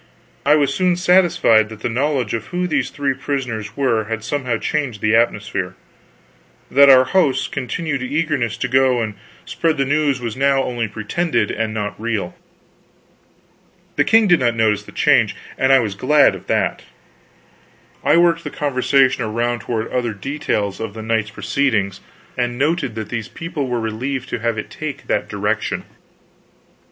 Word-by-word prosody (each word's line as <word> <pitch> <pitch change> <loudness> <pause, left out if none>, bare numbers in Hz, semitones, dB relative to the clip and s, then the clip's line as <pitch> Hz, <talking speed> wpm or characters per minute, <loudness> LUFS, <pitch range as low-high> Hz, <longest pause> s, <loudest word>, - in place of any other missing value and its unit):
I 150 - +6
was 145 -2 +2
soon 180 -1 +2
satisfied 175 - +4
that 110 -1 -11
the - - -1
knowledge 130 -1 -1
of 115 -1 -3
who 180 0 -2
these 135 -7 0
three 140 0 -1
prisoners 125 -6 -4
were 120 -6 +1
had 110 0 -4
somehow 125 -2 -1
changed 135 -4 -2
the 110 +1 +2
atmosphere; 105 -5 0 1.0
that 140 +1 +7
our 130 -1 +8
hosts' 135 -3 +1
continued 140 +2 -3
eagerness 140 -3 -1
to - - -2
go 130 -1 +3
and 110 -1 -4 0.3
spread 165 -2 -1
the 135 - +1
news 145 -1 +1
was 115 -3 -4
now 135 0 +2
only 120 -2 -2
pretended 110 - -1
and 110 0 -2
not 105 -1 -4
real. 110 -6 -2 1.6
The - - +3
king 225 -1 +4
did 175 -4 +5
not 120 -2 +1
notice 110 -2 +2
the - - -14
change, - - +3 0.2
and 135 0 +2
I 135 - +8
was 110 -6 -1
glad 140 +8 +4
of - - -10
that. - - 0 1.2
I - - +4
worked 170 -1 +3
the - - -4
conversation 135 -2 +1
around 120 +2 -1
toward 115 -1 -3
other 120 -4 -1
details 105 -4 -2
of 110 -2 -5
the 110 - -6
night's 110 -1 0
proceedings, 110 -5 -1 0.3
and 120 -1 -2
noted 140 -4 0
that 110 -2 -5
these 115 -2 -4
people 165 -5 -5
were 120 -1 -1
relieved 125 +4 -3
to - - -3
have 115 0 -1
it 110 - -5
take 155 -3 -6
that - - -1
direction. - - -2
125 Hz, 165 wpm, -19 LUFS, 110-145 Hz, 1.6 s, our